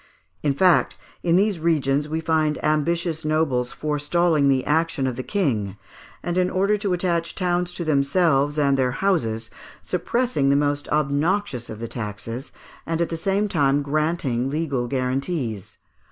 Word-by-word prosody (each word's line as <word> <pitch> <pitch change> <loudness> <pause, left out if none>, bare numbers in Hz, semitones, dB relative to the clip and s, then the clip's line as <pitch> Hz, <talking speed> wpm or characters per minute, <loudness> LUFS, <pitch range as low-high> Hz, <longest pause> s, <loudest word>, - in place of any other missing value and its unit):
In 140 -2 +1
fact, 180 +2 +3 0.2
in 170 -1 +2
these 195 -1 +2
regions 150 -3 +1
we 160 +1 -2
find 155 -2 +1
ambitious 160 +2 0
nobles 150 -6 0
forestalling 150 0 +1
the 130 -1 +2
action 160 -2 +1
of 130 -2 -1
the 130 - -3
King, 115 - -1 0.5
and 175 +1 0
in 180 0 +2
order 195 +3 +2
to 200 -2 -1
attach 170 -2 -1
towns 180 -1 0
to 170 - -3
themselves 145 0 +2
and 140 -2 +3
their 125 -1 +1
houses, 115 - 0 0.3
suppressing 210 - 0
the 140 - +4
most 145 0 0
obnoxious 150 - 0
of 110 - -6
the 115 +1 -5
taxes, 115 +3 -5 0.3
and 165 0 -2
at 170 - 0
the 165 - -3
same 195 +5 0
time 145 -5 +2
granting 145 -4 0
legal 140 -5 -1
guarantees. 130 - -2
150 Hz, 155 wpm, -23 LUFS, 135-170 Hz, 0.5 s, the